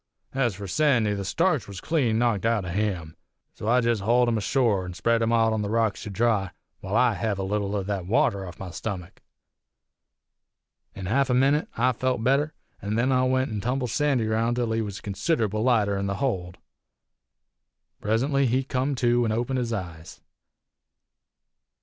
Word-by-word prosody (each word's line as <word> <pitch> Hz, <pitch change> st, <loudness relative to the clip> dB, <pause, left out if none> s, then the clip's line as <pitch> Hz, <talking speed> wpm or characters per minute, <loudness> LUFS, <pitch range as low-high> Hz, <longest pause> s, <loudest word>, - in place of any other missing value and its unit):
Ez 125 Hz, -6 st, 0 dB
for 100 Hz, +2 st, -7 dB
Sandy, 120 Hz, -3 st, +2 dB
the 100 Hz, -1 st, -3 dB
starch 165 Hz, -, +1 dB
was 100 Hz, -2 st, -7 dB
clean 125 Hz, -, +1 dB
knocked 115 Hz, -4 st, +1 dB
out 115 Hz, -4 st, +1 dB
o' -, -, -5 dB
him, 90 Hz, -5 st, -2 dB, 0.4 s
so 105 Hz, -, -7 dB
I 125 Hz, +2 st, +4 dB
jest 115 Hz, -3 st, +1 dB
hauled 120 Hz, +4 st, +3 dB
him 115 Hz, -, +1 dB
ashore 110 Hz, -4 st, +1 dB
an' 90 Hz, -1 st, -7 dB
spread 115 Hz, +4 st, +1 dB
him 115 Hz, 0 st, +1 dB
out 115 Hz, -1 st, +3 dB
on 110 Hz, -, -1 dB
the 100 Hz, -, -2 dB
rocks 110 Hz, -1 st, 0 dB
to -, -, -6 dB
dry 105 Hz, -2 st, +1 dB, 0.3 s
while 95 Hz, +3 st, -4 dB
I 125 Hz, -1 st, +4 dB
hev 105 Hz, -1 st, -2 dB
a 95 Hz, -, -3 dB
leetle 100 Hz, +1 st, -1 dB
o' 100 Hz, -, -1 dB
thet 95 Hz, -2 st, -3 dB
water 100 Hz, -2 st, +1 dB
off 90 Hz, -, -10 dB
my 95 Hz, -2 st, -6 dB
stummick. 90 Hz, -3 st, -6 dB, 1.7 s
In 95 Hz, -, -6 dB
half 135 Hz, +7 st, +1 dB
a 125 Hz, -, +3 dB
minit 140 Hz, +4 st, +3 dB
I 125 Hz, +3 st, +3 dB
felt 125 Hz, -1 st, -1 dB
better, 140 Hz, +5 st, +1 dB, 0.3 s
an' 100 Hz, +2 st, -2 dB
then 125 Hz, +4 st, +2 dB
I 130 Hz, -1 st, +3 dB
went 130 Hz, -1 st, +1 dB
an' 105 Hz, -2 st, -3 dB
tumbled 125 Hz, +1 st, -1 dB
Sandy 140 Hz, -5 st, +1 dB
roun' 115 Hz, +2 st, 0 dB
till 120 Hz, -2 st, -1 dB
he 115 Hz, 0 st, 0 dB
was 100 Hz, -2 st, -5 dB
considerable 110 Hz, -, -1 dB
lighter 105 Hz, -5 st, +2 dB
in 100 Hz, -, -2 dB
the 100 Hz, -, -2 dB
hold. 95 Hz, -10 st, -2 dB, 1.4 s
Presently 135 Hz, +6 st, +1 dB
he 130 Hz, +3 st, +1 dB
come 135 Hz, +1 st, -1 dB
to 120 Hz, -1 st, +2 dB
an' 110 Hz, -, 0 dB
opened 120 Hz, +4 st, -1 dB
his 120 Hz, -2 st, -2 dB
eyes. 85 Hz, -7 st, -6 dB
115 Hz, 185 wpm, -25 LUFS, 100-125 Hz, 1.7 s, I